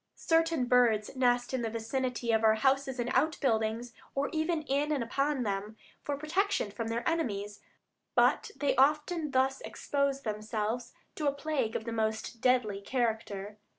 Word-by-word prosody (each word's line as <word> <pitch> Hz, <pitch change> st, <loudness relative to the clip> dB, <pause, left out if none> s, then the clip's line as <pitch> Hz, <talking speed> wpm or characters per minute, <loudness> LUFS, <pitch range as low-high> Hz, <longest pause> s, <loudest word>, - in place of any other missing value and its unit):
Certain 325 Hz, -4 st, +2 dB
birds 240 Hz, -3 st, +3 dB
nest 245 Hz, -1 st, +2 dB
in 260 Hz, -, 0 dB
the 230 Hz, -, -1 dB
vicinity 235 Hz, +1 st, -2 dB
of 220 Hz, 0 st, +2 dB
our 220 Hz, 0 st, +6 dB
houses 265 Hz, +2 st, +1 dB
and 240 Hz, +1 st, -1 dB
outbuildings, 235 Hz, -6 st, +1 dB, 0.2 s
or 280 Hz, +1 st, 0 dB
even 315 Hz, 0 st, 0 dB
in 290 Hz, +1 st, 0 dB
and 280 Hz, -5 st, +1 dB
upon 275 Hz, +3 st, 0 dB
them, 205 Hz, +1 st, -3 dB, 0.2 s
for 285 Hz, -1 st, -3 dB
protection 315 Hz, -, 0 dB
from 225 Hz, +2 st, -4 dB
their 230 Hz, +1 st, -2 dB
enemies, 210 Hz, -11 st, -1 dB, 0.6 s
but -, -, +3 dB
they 280 Hz, +1 st, 0 dB
often 300 Hz, +4 st, +2 dB
thus 265 Hz, 0 st, +1 dB
expose 280 Hz, -1 st, -1 dB
themselves 220 Hz, +2 st, -3 dB, 0.2 s
to 300 Hz, -, -2 dB
a -, -, +4 dB
plague 280 Hz, -5 st, -2 dB
of 220 Hz, -, -3 dB
the 230 Hz, -, -3 dB
most 220 Hz, +1 st, -2 dB
deadly 245 Hz, -6 st, +2 dB
character. 215 Hz, -3 st, -2 dB
250 Hz, 155 wpm, -30 LUFS, 220-280 Hz, 0.6 s, our